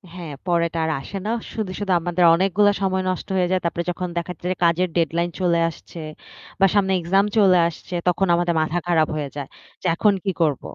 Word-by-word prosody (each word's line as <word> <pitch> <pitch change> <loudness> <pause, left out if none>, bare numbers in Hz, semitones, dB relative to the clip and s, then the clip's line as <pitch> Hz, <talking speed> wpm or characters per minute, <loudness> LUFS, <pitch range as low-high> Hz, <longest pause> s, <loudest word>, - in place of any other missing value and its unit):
হ্যাঁ 170 -5 -7
পরে 170 -1 +2
এটা 165 0 -4
আর 160 - 0
আসে 195 - -7
না। 220 - -1 0.2
শুধু, 215 -4 -3
শুধু 205 -2 -2
আমাদের 175 +1 0
অনেকগুলা 195 +3 +3
সময় 190 -1 0
নষ্ট 185 - -3
হয়ে 180 -1 +1
যায়। 185 - +2
তারপরে 170 0 -1
যখন 180 +1 -4
দেখাচ্ছে 175 0 -5
যে - - -1
কাজের 170 +2 +2
ডেডলাইন 170 +1 +1
চলে 170 -2 +2
আসছে 165 +1 -12 0.6
বা 195 - +6
সামনে 195 -2 +3
এক্সাম 195 +4 +2
চলে 190 -3 +6
আসছে 170 +2 -9
তখন 180 +2 +2
আমাদের 175 0 +1
মাথা 155 +2 -1
খারাপ 160 -3 +3
হয়ে 145 -2 -3
যায়। 140 -2 -5 0.3
যে 185 - -2
এখন 210 +3 +3
কি 195 - 0
করব। 150 -5 +1
175 Hz, 205 wpm, -22 LUFS, 170-190 Hz, 0.6 s, বা